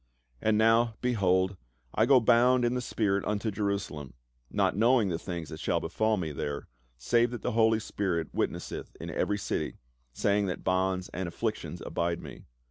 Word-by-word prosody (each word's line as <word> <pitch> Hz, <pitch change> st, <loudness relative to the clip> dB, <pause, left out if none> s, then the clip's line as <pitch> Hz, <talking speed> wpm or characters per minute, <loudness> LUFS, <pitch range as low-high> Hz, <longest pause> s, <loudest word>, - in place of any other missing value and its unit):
" -, -, -38 dB
And 110 Hz, -1 st, +2 dB
now, 115 Hz, +1 st, +4 dB
behold, 95 Hz, -6 st, +2 dB, 0.4 s
I 110 Hz, -, +3 dB
go 135 Hz, -1 st, +7 dB
bound 120 Hz, +2 st, +4 dB
in 120 Hz, -, +1 dB
the 125 Hz, -, -1 dB
spirit 100 Hz, -4 st, 0 dB
unto 105 Hz, +1 st, -1 dB
Jerusalem, 100 Hz, -, -3 dB, 0.3 s
not -, -, +1 dB
knowing 115 Hz, 0 st, +4 dB
the 85 Hz, -2 st, -2 dB
things 85 Hz, -4 st, -5 dB
that -, -, -7 dB
shall -, -, 0 dB
befall 110 Hz, 0 st, 0 dB
me 80 Hz, -5 st, -3 dB
there, 70 Hz, 0 st, -4 dB, 0.3 s
save 120 Hz, -, +2 dB
that 120 Hz, -1 st, -7 dB
the -, -, 0 dB
Holy 110 Hz, 0 st, +3 dB
Spirit 90 Hz, -7 st, -2 dB
witnesseth -, -, -3 dB
in -, -, -6 dB
every 105 Hz, -, 0 dB
city, 100 Hz, -, -3 dB, 0.3 s
saying 100 Hz, +9 st, +1 dB
that 90 Hz, -, -4 dB
bonds 95 Hz, 0 st, 0 dB
and 95 Hz, 0 st, -4 dB
afflictions 85 Hz, -, -3 dB
abide 85 Hz, 0 st, -1 dB
me. -, -, -10 dB
100 Hz, 175 wpm, -29 LUFS, 90-115 Hz, 0.4 s, go